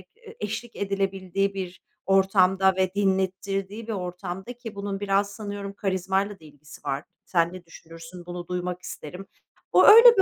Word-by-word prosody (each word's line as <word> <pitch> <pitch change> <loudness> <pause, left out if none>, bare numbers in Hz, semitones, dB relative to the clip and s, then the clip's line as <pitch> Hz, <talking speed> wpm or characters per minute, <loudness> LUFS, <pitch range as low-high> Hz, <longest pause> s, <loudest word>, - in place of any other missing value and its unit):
e 455 -1 -14
eşlik 225 +3 -4
edilebildiği 195 -1 -1
bir 185 -2 -6 0.2
ortamda 190 0 +4
ve 185 -1 +1
dinlettirdiği 195 +2 -1
bir 225 - -2
ortamda, 180 +3 -5
ki 235 -3 -9
bunun 200 -1 -3
biraz 200 0 +1
sanıyorum 205 -1 -6
karizmayla 195 +1 -1
da 160 - -16
ilgisi 150 0 -15
var, 140 +1 -2 0.2
sen 170 -1 +1
ne 185 -1 -10
düşünürsün, 165 +1 -12
bunu 175 0 -6
duymak 180 0 -3
isterim. 180 +3 -8 0.4
O, - - +7
öyle 465 +2 +10
bir - - +7
190 Hz, 155 wpm, -26 LUFS, 180-200 Hz, 0.4 s, öyle